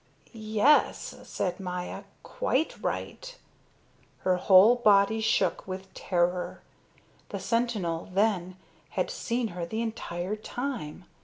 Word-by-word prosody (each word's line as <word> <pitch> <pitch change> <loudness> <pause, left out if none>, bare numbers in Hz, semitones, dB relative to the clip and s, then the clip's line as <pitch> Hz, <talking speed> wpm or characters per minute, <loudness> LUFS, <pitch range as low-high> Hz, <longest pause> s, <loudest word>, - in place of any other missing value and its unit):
"Yes," 220 +6 +2
said 180 0 -3
Maya, 180 -1 -5 0.2
"quite 315 - -1
right." - - -4 0.8
Her 185 -1 +2
whole 195 +5 +7
body 210 -1 +4
shook 200 -6 +1
with 190 0 -7
terror. 180 0 -1 0.7
The - - -4
sentinel, 215 -9 -1
then, 185 -2 +1 0.4
had - - 0
seen 240 - -2
her 175 -2 -5
the 220 +7 -2
entire 200 -4 -4
time. 215 - -5
200 Hz, 105 wpm, -28 LUFS, 180-230 Hz, 0.8 s, whole